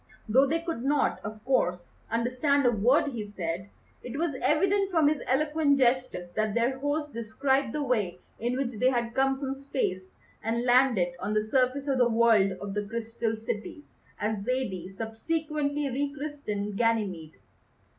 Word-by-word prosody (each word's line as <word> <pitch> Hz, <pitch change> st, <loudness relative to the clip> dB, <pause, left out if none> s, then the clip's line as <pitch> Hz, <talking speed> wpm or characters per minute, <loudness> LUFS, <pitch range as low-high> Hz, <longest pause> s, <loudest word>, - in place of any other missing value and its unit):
Though 260 Hz, +6 st, +5 dB
they 325 Hz, +4 st, 0 dB
could 330 Hz, -8 st, -4 dB
not, 285 Hz, +1 st, +1 dB
of 215 Hz, +1 st, -7 dB
course, 180 Hz, -9 st, 0 dB, 0.2 s
understand 255 Hz, +5 st, +1 dB
a 245 Hz, -, +5 dB
word 245 Hz, +7 st, +3 dB
he 230 Hz, -4 st, -4 dB
said, 185 Hz, -2 st, -4 dB, 0.3 s
it 250 Hz, +3 st, -6 dB
was 330 Hz, -1 st, 0 dB
evident 390 Hz, +6 st, +2 dB
from 325 Hz, -5 st, +3 dB
his 300 Hz, -1 st, +1 dB
eloquent 295 Hz, +1 st, +2 dB
gestures 250 Hz, -8 st, +1 dB
that 215 Hz, +2 st, -1 dB
their 245 Hz, +3 st, +1 dB
host 290 Hz, +1 st, -2 dB
described 265 Hz, +3 st, 0 dB
the 300 Hz, +2 st, -2 dB
way 210 Hz, -9 st, 0 dB, 0.2 s
in 240 Hz, +2 st, -1 dB
which 250 Hz, -5 st, -2 dB
they 255 Hz, -, +4 dB
had 235 Hz, -2 st, -1 dB
come 270 Hz, +1 st, +2 dB
from 270 Hz, -1 st, -2 dB
Space 260 Hz, -9 st, -3 dB, 0.3 s
and 230 Hz, +2 st, -1 dB
landed 245 Hz, -8 st, +4 dB
on 210 Hz, -, -2 dB
the 215 Hz, -, +2 dB
surface 255 Hz, +4 st, +1 dB
of 270 Hz, -2 st, +1 dB
the 245 Hz, -1 st, +4 dB
World 225 Hz, -4 st, +4 dB
of 195 Hz, +1 st, -6 dB
the 205 Hz, 0 st, -2 dB
Crystal 225 Hz, 0 st, -2 dB
Cities, 225 Hz, +6 st, -5 dB, 0.4 s
as 210 Hz, -1 st, -1 dB
Zaidie 205 Hz, -7 st, -2 dB
subsequently 290 Hz, +7 st, -2 dB
re 280 Hz, +3 st, -1 dB
christened 215 Hz, -9 st, -4 dB
Ganymede. 200 Hz, -9 st, 0 dB
245 Hz, 165 wpm, -28 LUFS, 215-280 Hz, 0.4 s, Though